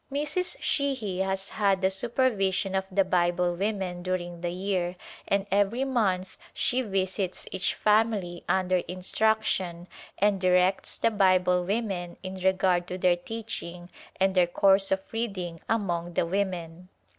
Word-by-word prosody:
Mrs. 300 Hz, +6 st, -1 dB
Sheahy 260 Hz, -10 st, -1 dB
has 190 Hz, +1 st, -1 dB
had 200 Hz, -3 st, +1 dB
the 190 Hz, 0 st, +2 dB
supervision 195 Hz, -3 st, 0 dB
of 190 Hz, 0 st, 0 dB
the 195 Hz, +1 st, +3 dB
Bible 175 Hz, -1 st, +1 dB
women 190 Hz, -2 st, -2 dB
during 175 Hz, -1 st, -3 dB
the 175 Hz, -, -1 dB
year 180 Hz, -1 st, -2 dB, 0.3 s
and 200 Hz, 0 st, +1 dB
every 205 Hz, +6 st, +2 dB
month 200 Hz, -9 st, 0 dB, 0.2 s
she 255 Hz, +1 st, +1 dB
visits 190 Hz, -3 st, -2 dB
each 190 Hz, 0 st, -1 dB
family 210 Hz, -5 st, +1 dB
under 185 Hz, -1 st, +2 dB
instruction 185 Hz, -1 st, 0 dB, 0.3 s
and 200 Hz, -1 st, +2 dB
directs 185 Hz, +1 st, +2 dB
the 230 Hz, -, +2 dB
Bible 185 Hz, -3 st, +3 dB
women 195 Hz, -4 st, -2 dB
in 185 Hz, 0 st, -5 dB
regard 185 Hz, -1 st, +2 dB
to 180 Hz, -, -4 dB
their 180 Hz, -1 st, +3 dB
teaching 175 Hz, -3 st, -6 dB, 0.3 s
and 190 Hz, 0 st, +3 dB
their 180 Hz, -2 st, +4 dB
course 195 Hz, +2 st, +3 dB
of 190 Hz, 0 st, +1 dB
reading 190 Hz, -7 st, -3 dB
among 175 Hz, -6 st, -1 dB
the -, -, +2 dB
women. 180 Hz, -2 st, -3 dB
190 Hz, 140 wpm, -27 LUFS, 180-205 Hz, 0.3 s, their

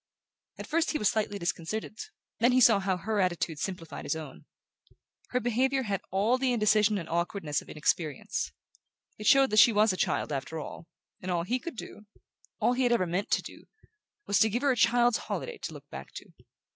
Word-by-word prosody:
At -, -, -7 dB
first 325 Hz, +1 st, 0 dB
he -, -, +1 dB
was 210 Hz, -, +2 dB
slightly 215 Hz, -3 st, -1 dB
disconcerted; 175 Hz, +5 st, -4 dB, 0.4 s
then 240 Hz, +2 st, +4 dB
he 255 Hz, -, +5 dB
saw 225 Hz, -4 st, +6 dB
how 190 Hz, -1 st, 0 dB
her 210 Hz, +4 st, -2 dB
attitude 175 Hz, -4 st, 0 dB
simplified 175 Hz, -3 st, -5 dB
his -, -, -1 dB
own. 155 Hz, -4 st, -9 dB, 0.8 s
Her 250 Hz, -, 0 dB
behaviour 260 Hz, +3 st, +1 dB
had 200 Hz, -4 st, -2 dB
all 215 Hz, +7 st, +2 dB
the 260 Hz, -1 st, +1 dB
indecision 215 Hz, -1 st, +3 dB
and 170 Hz, -4 st, -5 dB
awkwardness 170 Hz, -2 st, -1 dB
of -, -, -16 dB
inexperience. 150 Hz, -1 st, -1 dB, 0.7 s
It 210 Hz, -, -3 dB
showed 275 Hz, -1 st, +6 dB
that 215 Hz, -, +5 dB
she 230 Hz, -, +8 dB
was 210 Hz, -1 st, +3 dB
a -, -, -5 dB
child -, -, 0 dB
after 145 Hz, +3 st, -4 dB
all; 160 Hz, -, -8 dB, 0.3 s
and 185 Hz, -, -5 dB
all 175 Hz, -2 st, 0 dB
he 245 Hz, +8 st, -1 dB
could 335 Hz, +3 st, -7 dB
do 210 Hz, -1 st, -9 dB, 0.5 s
all 245 Hz, -, +3 dB
he 255 Hz, -, -1 dB
had 245 Hz, -1 st, +3 dB
ever 235 Hz, -6 st, +3 dB
meant 180 Hz, +4 st, -2 dB
to -, -, +1 dB
do -, -, -11 dB, 0.6 s
was 200 Hz, -, +2 dB
to 220 Hz, -, +5 dB
give 240 Hz, +6 st, -2 dB
her 280 Hz, -, +4 dB
a -, -, +1 dB
child's 240 Hz, 0 st, +3 dB
holiday 485 Hz, -2 st, -5 dB
to -, -, -6 dB
look -, -, -12 dB
back -, -, -8 dB
to. -, -, -11 dB
210 Hz, 205 wpm, -29 LUFS, 175-245 Hz, 0.8 s, she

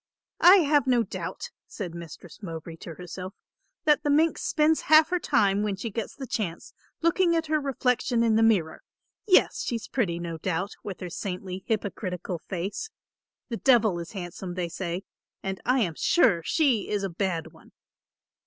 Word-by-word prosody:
"I 360 Hz, +2 st, +9 dB
have 290 Hz, -3 st, +3 dB
no 245 Hz, -2 st, +4 dB
doubt," 485 Hz, -, -6 dB, 0.2 s
said 180 Hz, -6 st, -6 dB
Mistress 170 Hz, +2 st, -10 dB
Mowbray 165 Hz, -3 st, -7 dB
to 165 Hz, 0 st, -9 dB
herself, 180 Hz, +2 st, -8 dB, 0.5 s
"that 300 Hz, -1 st, +4 dB
the 295 Hz, -, -1 dB
minx 315 Hz, +3 st, +3 dB
spends 310 Hz, 0 st, +2 dB
half 310 Hz, 0 st, +7 dB
her 360 Hz, 0 st, +1 dB
time 200 Hz, -, +2 dB
when 210 Hz, -2 st, -1 dB
she 220 Hz, +4 st, -5 dB
gets 225 Hz, 0 st, -4 dB
the 270 Hz, -, -6 dB
chance, 195 Hz, -8 st, -4 dB, 0.3 s
looking 335 Hz, +1 st, +3 dB
at 325 Hz, -1 st, 0 dB
her 310 Hz, -1 st, +1 dB
reflection 250 Hz, -3 st, +1 dB
in 225 Hz, -2 st, +3 dB
the 225 Hz, -, +4 dB
mirror. 200 Hz, -8 st, +2 dB, 0.5 s
Yes, 370 Hz, -, +4 dB
she's 230 Hz, -2 st, -3 dB
pretty, 190 Hz, -10 st, -1 dB
no 170 Hz, -1 st, -5 dB
doubt, 185 Hz, +4 st, -2 dB
with 200 Hz, -2 st, -7 dB
her 180 Hz, -, -4 dB
saintly 185 Hz, 0 st, -5 dB
hypocritical 185 Hz, -5 st, -3 dB
face, 195 Hz, -, -3 dB, 0.6 s
the 230 Hz, -, -3 dB
Devil 220 Hz, -9 st, +4 dB
is 170 Hz, +3 st, -8 dB
handsome, 180 Hz, -1 st, -6 dB
they 175 Hz, -2 st, -2 dB
say; 175 Hz, +1 st, -4 dB, 0.4 s
and 190 Hz, 0 st, -4 dB
I 255 Hz, +1 st, +3 dB
am 175 Hz, -7 st, 0 dB
sure 175 Hz, -, +3 dB
she 260 Hz, -, +1 dB
is 205 Hz, -1 st, -1 dB
a 195 Hz, -, -1 dB
bad 170 Hz, -2 st, -2 dB
one." -, -, -19 dB
205 Hz, 170 wpm, -27 LUFS, 180-265 Hz, 0.6 s, I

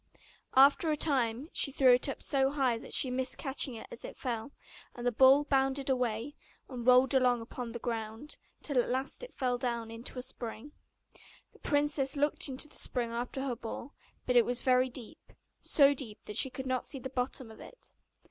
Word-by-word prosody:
After 280 Hz, +5 st, +5 dB
a 305 Hz, -, +1 dB
time 265 Hz, -1 st, 0 dB
she 275 Hz, -, +3 dB
threw 260 Hz, -2 st, +5 dB
it 250 Hz, +3 st, +4 dB
up -, -, -5 dB
so 270 Hz, -1 st, +2 dB
high 265 Hz, -5 st, 0 dB
that -, -, -12 dB
she 255 Hz, -, +2 dB
missed 255 Hz, 0 st, -1 dB
catching 265 Hz, -2 st, 0 dB
it 220 Hz, -, -8 dB
as 485 Hz, -, -8 dB
it -, -, -9 dB
fell; 235 Hz, 0 st, -4 dB, 0.4 s
and 240 Hz, -, -7 dB
the 245 Hz, -, +2 dB
ball 265 Hz, +4 st, +6 dB
bounded 270 Hz, -1 st, 0 dB
away, 250 Hz, +1 st, -1 dB, 0.3 s
and 245 Hz, -2 st, -7 dB
rolled 255 Hz, +1 st, +6 dB
along 250 Hz, -2 st, +3 dB
upon 230 Hz, +1 st, -7 dB
the 235 Hz, -, -5 dB
ground, 225 Hz, +3 st, -5 dB, 0.3 s
till 280 Hz, -4 st, +1 dB
at -, -, -5 dB
last 260 Hz, +2 st, -2 dB
it -, -, -9 dB
fell 250 Hz, -2 st, -1 dB
down 235 Hz, -2 st, -3 dB
into 230 Hz, +3 st, -6 dB
the 250 Hz, -, -5 dB
spring. 245 Hz, +1 st, -7 dB, 0.8 s
The -, -, -21 dB
princess 290 Hz, -2 st, 0 dB
looked 290 Hz, +1 st, +2 dB
into 265 Hz, +3 st, -2 dB
the -, -, -19 dB
spring 240 Hz, -2 st, -1 dB
after 245 Hz, +3 st, -4 dB
her 255 Hz, -3 st, -2 dB
ball, 235 Hz, +4 st, -8 dB, 0.3 s
but 250 Hz, -, 0 dB
it 240 Hz, -, +7 dB
was 245 Hz, +1 st, -1 dB
very 255 Hz, -1 st, +3 dB
deep, 245 Hz, -2 st, -12 dB, 0.3 s
so 285 Hz, -1 st, +5 dB
deep 245 Hz, -6 st, -9 dB
that 210 Hz, -, -8 dB
she 265 Hz, -, +3 dB
could 260 Hz, +1 st, -7 dB
not 255 Hz, -1 st, -1 dB
see 285 Hz, -, -3 dB
the 260 Hz, 0 st, -7 dB
bottom 250 Hz, -2 st, -3 dB
of 220 Hz, -, -14 dB
it. -, -, -14 dB
255 Hz, 205 wpm, -31 LUFS, 240-275 Hz, 0.8 s, it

